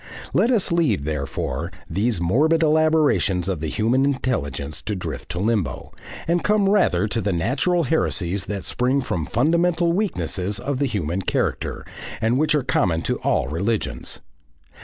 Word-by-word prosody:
Let 235 - +3
us 225 -9 +2
leave, 155 - +2
therefore, 80 +3 -3 0.2
these 100 +3 0
morbid 150 - +3
elaborations 155 - +3
of 95 -5 -1
the 80 - -3
human 115 - +1
intelligence 75 - -2
to 105 - -3
drift 85 -5 -6
to 90 - -4
limbo, 100 - -1 0.4
and 170 +1 +1
come 210 -1 +3
rather 145 - +3
to 115 +2 -2
the 100 0 0
natural 135 - +1
heresies 100 - 0
that 100 -2 -4
spring 130 +3 +1
from 85 - -3
fundamental 170 +6 +2
weaknesses 100 - -1
of 135 +2 -2
the 140 - +2
human 95 - -2
character, - - -2 0.3
and 115 +3 +1
which 155 0 +2
are 145 - +1
common 85 -9 +1
to - - -1
all - - +1
religions. 100 - -2
115 Hz, 155 wpm, -22 LUFS, -, 0.4 s, Let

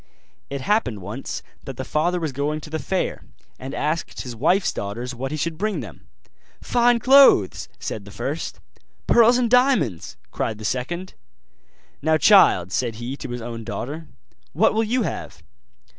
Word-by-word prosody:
It 140 -1 -4
happened 130 - 0
once 110 +8 -6 0.2
that 135 -3 -8
the 130 - -4
father 175 +4 0
was 160 -3 -2
going 145 +3 -2
to 155 - -11
the 160 - -2
fair, 190 +3 -2 0.4
and 130 +1 -6
asked 155 +3 -2
his 125 -2 -7
wife's 175 - +2
daughters 115 +6 -5
what 130 +2 -4
he 155 - -4
should 160 +1 -3
bring 210 -5 -1
them. 100 -9 -11 0.5
'Fine 240 0 +3
clothes,' 270 +3 +5
said - - -5
the - - -11
first; - - -4 0.5
'Pearls 235 +1 +5
and 250 -1 +2
diamonds,' 240 - +2
cried 110 - -2
the 110 - -8
second. 170 - -3 0.9
'Now, 155 +1 +3
child,' 155 - +5
said 115 +4 -1
he 120 +4 -5
to - - -7
his 120 -1 -5
own 115 -1 -6
daughter, 145 +8 -5 0.5
'what - - +3
will 220 +1 +2
you 240 +3 0
have? - - -6
150 Hz, 165 wpm, -23 LUFS, 120-195 Hz, 0.9 s, clothes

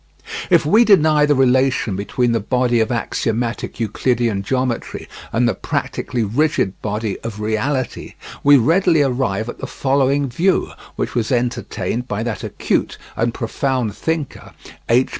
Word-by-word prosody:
If 170 -5 +4
we 215 +10 +5
deny 155 -8 +4
the 145 - +3
relation 130 -5 +2
between 120 +5 0
the 115 - +1
body 120 +2 +1
of 110 +1 +1
axiomatic 115 0 -2
Euclidean 115 -1 0
geometry 125 +2 -2 0.2
and 120 +1 +2
the 115 - +2
practically 120 +5 -3
rigid 125 - 0
body 105 -1 -3
of 110 -2 -7
reality, 110 +5 -2 0.3
we 145 0 +7
readily 165 +4 +3
arrive 120 -6 -1
at 120 - -7
the - - -5
following 140 +1 +1
view, 175 +10 +1 0.2
which - - -3
was 120 +1 -1
entertained 125 0 -2
by 105 -1 -2
that 115 -4 -4
acute - - -1 0.2
and 115 +1 0
profound 120 -1 -2
thinker, 160 -4 -4 0.4
H. 125 +3 +3
125 Hz, 140 wpm, -19 LUFS, 115-140 Hz, 0.4 s, we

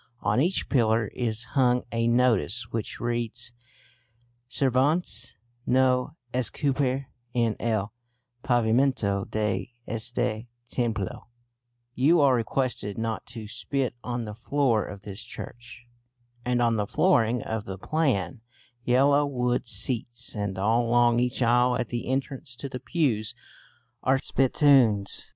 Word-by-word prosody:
On 125 - +2
each 180 +5 +1
pillar 110 -4 +2
is 115 -1 -2
hung 125 -3 +3
a 115 0 0
notice 120 - +2
which 115 -2 -4
reads: 120 0 -2 1.0
"Sirvanse 130 - +1 0.3
no 130 +2 +2 0.2
Escupir 130 +1 0 0.3
en 115 -2 +2
el 110 -2 -1 0.5
Pavimento 115 -4 +1
de 105 +1 -2
este 115 0 -2 0.2
Templo" 115 -4 -3 0.6
("You 150 +8 +4
are 140 -3 +5
requested 120 -3 -1
not 115 -1 -3
to 115 -3 -8
spit 130 +3 -2
on 120 -1 -3
the 105 - -6
floor 120 0 +1
of 100 0 -9
this 100 +1 -6
church"), 120 0 -10 0.6
and 125 0 +1
on 115 -1 +2
the 105 -1 -1
flooring 120 - +2
of 110 -2 -4
the 95 0 -6
plain 120 - 0 0.4
yellow 140 +4 +4
wood 125 -3 -1
seats, 120 +2 -1
and 100 -3 -3
all 110 +5 +2
along 120 0 +4
each 125 +1 0
aisle 120 +1 +4
at 125 - -3
the 120 -1 -4
entrance 130 -1 -3
to 140 - -5
the 130 -1 -6
pews, 125 - 0 0.7
are 135 +1 +3
spittoons! 130 -7 +2
120 Hz, 125 wpm, -26 LUFS, 110-130 Hz, 1.0 s, are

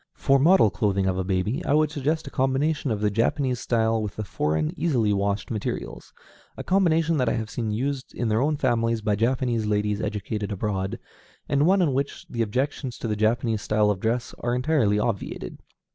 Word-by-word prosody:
For 135 0 +3
model 160 - +5
clothing 100 -3 0
for 95 0 0
a - - 0
baby, 95 +5 -1
I 145 - +2
would 155 -1 +2
suggest 155 +2 -1
a 140 - -8
combination 135 +3 0
of 105 -3 -1
the 105 -1 +2
Japanese 125 +4 0
style 115 -1 +1
with 105 -2 -4
the 110 - -4
foreign, 75 -5 -1
easily 125 -11 +1
washed 100 +2 -1
materials, 110 -3 -4 0.5
a - - -5
combination 165 -4 +2
that 125 -4 +2
I - - 0
have 110 -3 -3
seen 110 +1 -3
used 130 +5 -2
in 120 - -1
their 110 +2 +2
own 150 +2 +1
families 115 -4 0
by 105 -1 +1
Japanese 115 0 0
ladies 105 0 0
educated 105 0 -3
abroad, 95 -1 -2 0.5
and 140 +2 +2
one 190 0 +4
in 145 -6 +1
which 140 +2 -3
the 115 - -3
objections 125 +3 -2
to - - -4
the 105 - -1
Japanese 110 +1 +1
style 105 -1 +2
of 100 - -3
dress 115 +3 -1
are 120 0 -1
entirely 125 -6 +2
obviated. 105 -1 -3
115 Hz, 195 wpm, -25 LUFS, 105-135 Hz, 0.5 s, model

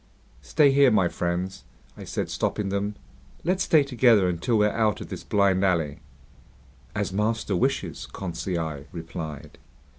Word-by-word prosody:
"Stay 150 -3 +4
here, 140 -1 +6
my 100 -6 +3
friends," 90 +2 -3 0.3
I - - -9
said, - - -3
stopping 105 -2 -1
them. 100 +1 -2 0.5
"Let's 185 +2 +1
stay 155 -3 +5
together 120 -7 +4
until 90 +7 0
we're 105 0 +3
out 110 -2 +1
of - - -8
this - - -6
blind 100 -2 +2
alley." 80 -6 +1 1.0
"As 100 -2 -2
master 105 0 0
wishes," 85 - -1
Conseil 85 -5 -4
replied. 80 -3 -7
100 Hz, 140 wpm, -25 LUFS, 85-110 Hz, 1.0 s, here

